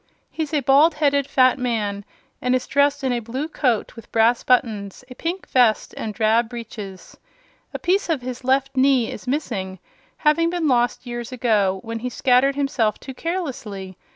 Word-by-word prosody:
He's 315 -3 -4
a 300 -2 +1
bald 285 +5 +5
headed 285 -2 +2
fat 255 +1 +3
man 210 -5 -2 0.4
and 250 0 +2
is 255 - -1
dressed 285 0 +2
in 260 -2 +1
a 240 - 0
blue 250 +6 -4
coat 250 -8 -1
with 230 - -13
brass 230 +2 +3
buttons, 220 -5 0
a - - -5
pink 340 +8 -4
vest 240 -4 +2
and 220 - -4
drab 220 +2 +2
breeches. 215 -5 -9 0.6
A - - -4
piece 370 +1 0
of 300 -6 0
his 255 +1 -6
left 270 +1 +1
knee 260 -3 +3
is - - -9
missing, 220 -9 -3 0.4
having 330 +2 +3
been 345 -2 -1
lost 245 -1 +1
years 240 -1 -6
ago 210 -6 +1
when 230 0 -5
he 250 +2 -3
scattered 255 +2 +3
himself 265 -7 0
too 265 - -8
carelessly. 250 - -5
250 Hz, 175 wpm, -22 LUFS, 225-280 Hz, 0.6 s, bald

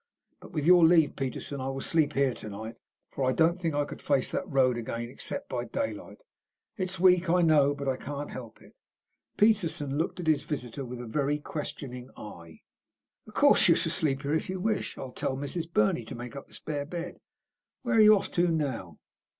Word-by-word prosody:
But, - - -13
with 150 -3 -2
your 175 0 +7
leave, 160 -3 +5
Peterson, 135 +1 -4
I 130 - -3
will 135 0 -3
sleep 150 +1 +1
here 135 -2 +2
to 110 - -8
night, 110 +3 -7 0.3
for 135 - -3
I 130 0 +2
don't 170 +4 +3
think 165 -4 -1
I 145 0 +1
could - - -9
face 140 -3 +1
that - - -3
road 130 -3 +3
again 115 0 -4
except 130 - -5
by 120 -1 -3
daylight. 280 - -4 0.6
It's 185 -1 -3
weak, 180 -1 +4
I 175 +1 +4
know, 145 -3 +4
but 140 -1 -5
I 130 -1 0
can't 145 +2 -6
help 115 -4 -9
it." - - -18 0.6
Peterson 165 -10 +2
looked 165 - -2
at 175 - -4
his 155 -2 +3
visitor 135 -2 -5
with 125 0 -7
a - - -7
very 145 +5 0
questioning 135 -4 -6
eye. 85 -6 -11 0.7
"Of - - -14
course - - +5
you - - +6
shall - - 0
sleep 140 -2 0
here 140 +1 -1
if 160 - -1
you 185 0 -3
wish. 215 +2 -1
I'll 130 -2 -7
tell 130 +1 -2
Mrs. 160 +4 -4
Burney 105 -2 +2
to 125 - -7
make 120 +1 -8
up 140 - -8
the - - -13
spare 145 -2 -4
bed. 175 +1 -6 0.6
Where 240 -2 +1
are - - +7
you 215 0 +8
off 200 - -3
to 175 0 +2
now?" 135 - -2
145 Hz, 210 wpm, -28 LUFS, 130-170 Hz, 0.7 s, you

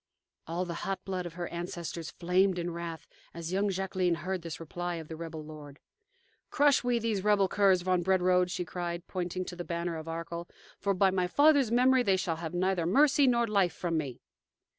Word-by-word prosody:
All 170 +3 -2
the 170 - -4
hot 195 0 -3
blood 185 -2 -3
of 165 - -11
her 175 -1 -4
ancestors 170 -1 -5
flamed 180 +2 +1
in 175 0 -2
wrath 165 -3 -6 0.3
as 170 +1 -5
young 200 +2 +1
Jacqueline 185 -2 0
heard 185 +2 -3
this 165 -2 -6
reply 175 +2 -4
of 160 -2 -8
the 160 - -5
rebel 160 -1 -7
lord. 150 -2 -11 0.7
"Crush 285 -2 +4
we 245 -1 +2
these 220 -4 -1
rebel 205 -2 +4
curs, 190 -3 +3
von 185 -1 +2
Brederode," 180 0 +3
she 180 - -3
cried, 175 0 -4
pointing 180 0 -3
to 180 - -7
the 175 - -5
banner 170 -1 -3
of 160 0 -8
Arkell; 170 +1 -5 0.3
"for 200 -1 0
by 190 +1 +4
my 185 -1 +1
father's 285 +3 +4
memory, 255 +2 +4
they 195 -5 +2
shall 175 -4 -2
have 165 +1 -5
neither 180 -2 +1
mercy 280 - +4
nor 235 -1 +3
life 200 -6 +2
from 170 -1 -2
me." 140 -6 -3
180 Hz, 200 wpm, -30 LUFS, 170-195 Hz, 0.7 s, Crush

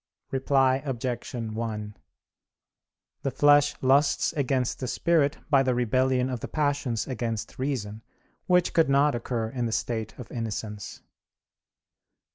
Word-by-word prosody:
Reply 135 -1 +3
Obj. 125 -3 -4
1: 110 -2 -4 1.3
The 135 - -1
flesh 145 +2 +4
lusts 140 +5 +3
against 130 -4 0
the 130 - -3
spirit 150 +1 +2
by 140 -2 +6
the 130 -2 +1
rebellion 130 +2 +2
of 125 -2 -3
the - - -5
passions 145 -6 -1
against 115 -4 -4
reason; 115 -6 -3 0.5
which 180 -1 +3
could 165 -4 +3
not 140 +1 +4
occur 115 -1 -2
in 120 -2 -2
the - - -3
state 110 -1 -3
of 125 - -10
innocence. 110 -3 -5
130 Hz, 125 wpm, -27 LUFS, 115-140 Hz, 1.3 s, by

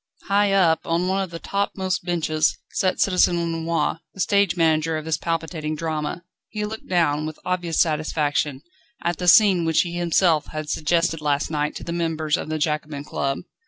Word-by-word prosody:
High 200 0 +3
up, 175 -5 +4
on 170 +2 0
one 190 +1 +1
of 190 - -3
the 165 - -6
topmost 190 0 -2
benches, 160 -3 0
sat 185 -1 0
Citizen 180 -2 +3
Lenoir, 165 -1 -1 0.2
the - - -13
stage 200 -2 +2
manager 160 -1 +2
of 155 - -6
this 160 -2 -1
palpitating 160 -2 -3
drama. 160 +1 -3 0.3
He 210 -1 -3
looked 220 +1 -7
down, 155 -4 +1
with 155 - -7
obvious 175 -3 -1
satisfaction, 150 -3 0 0.4
at 170 -1 0
the 180 - -3
scene 190 -2 +6
which 160 -1 +3
he 175 -1 -4
himself 170 -2 +2
had 155 -1 -5
suggested 165 0 +1
last 145 0 0
night 150 -1 -1
to - - -7
the 170 - -4
members 160 -2 0
of 165 - -5
the 155 - -1
Jacobin 150 -1 -2
Club. 135 -1 -2
165 Hz, 180 wpm, -23 LUFS, 155-180 Hz, 0.4 s, scene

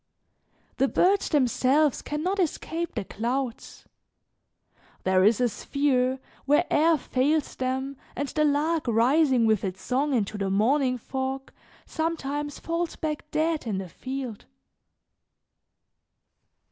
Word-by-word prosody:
The 270 - +3
birds 385 +7 +2
themselves 275 +1 +2
can 300 +1 -4
not 385 +3 0
escape 335 -1 -2
the 220 - -2
clouds; 240 +3 -4 1.2
there 185 0 +3
is 215 +4 +4
a 250 - +3
sphere 260 +2 0 0.3
where 295 +5 +4
air 320 +1 +4
fails 285 +3 0
them 265 +1 -2 0.2
and 285 +2 -2
the 305 - +1
lark 300 +1 +1
rising 250 +2 +3
with 220 -3 +2
its 190 -1 -4
song 275 +2 0
into 210 -2 -1
the 195 -1 -1
morning 250 +6 +2
fog, 265 +2 -4 0.3
sometimes 295 -3 -3
falls 335 0 -2
back 300 -1 -4
dead 315 -4 0
in 205 -4 -1
the 190 -2 -5
field. 255 +3 -6
270 Hz, 120 wpm, -26 LUFS, 245-305 Hz, 1.2 s, is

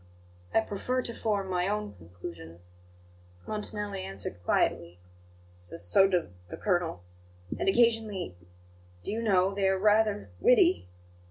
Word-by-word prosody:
"I 225 - +4
prefer 250 +5 -2
to 235 - -3
form 205 -4 -1
my 180 -1 0
own 210 +1 -2
conclusions," 85 0 -11 0.7
Montanelli 210 -2 -3
answered 95 - -6
quietly. 85 0 +1 0.5
"S 90 0 -6
so 190 - +5
does 180 -3 0 0.2
the - - -7
colonel. 175 - 0 0.6
And - - +2
occasionally, 220 - +2 0.7
do - - -3
you 225 +2 -2
know, 195 -3 +3
they 195 -1 +1
are 190 0 +2
rather 210 +1 +2
witty. 395 - +4
195 Hz, 125 wpm, -29 LUFS, -, 0.7 s, so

